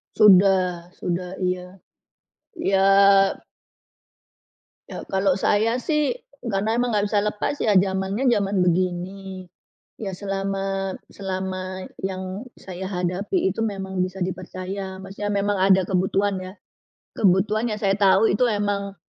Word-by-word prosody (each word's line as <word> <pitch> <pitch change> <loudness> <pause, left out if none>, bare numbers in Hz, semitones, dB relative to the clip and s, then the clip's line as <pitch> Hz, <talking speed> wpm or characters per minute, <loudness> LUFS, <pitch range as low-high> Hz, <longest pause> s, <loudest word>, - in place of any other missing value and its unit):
Sudah, 185 -3 +4
sudah, 180 +1 -3
iya. 180 0 -2 0.8
Ya 195 - +1 2.1
ya - - -7
kalau 190 0 +2
saya 220 +5 +1
sih 300 +2 +1 0.3
karena 220 +1 0
emang 245 -1 0
nggak 205 0 +2
bisa 210 - +2
lepas 210 +7 -2
ya 215 - +2
zamannya 190 +6 +1
zaman 200 -4 +1
begini. 185 +1 -2 0.5
Ya 200 -3 -4
selama, 195 0 -2 0.2
selama 185 -1 -5 0.2
yang 190 +2 -4 0.2
saya 185 0 -8
hadapi 185 - -1
itu 225 +4 -2
memang 190 -3 -2
bisa 185 +1 -8
dipercaya, 185 +1 -5
maksudnya 195 +2 -5
memang 205 0 0
ada 190 0 +4
kebutuhan 195 +1 +1
ya, 185 0 -7 0.6
kebutuhan 210 +4 +2
yang 215 - -2
saya 195 -1 +3
tahu 200 +2 +5
itu 240 +6 +2
emang, 205 -2 -1
195 Hz, 120 wpm, -23 LUFS, 185-205 Hz, 2.1 s, tahu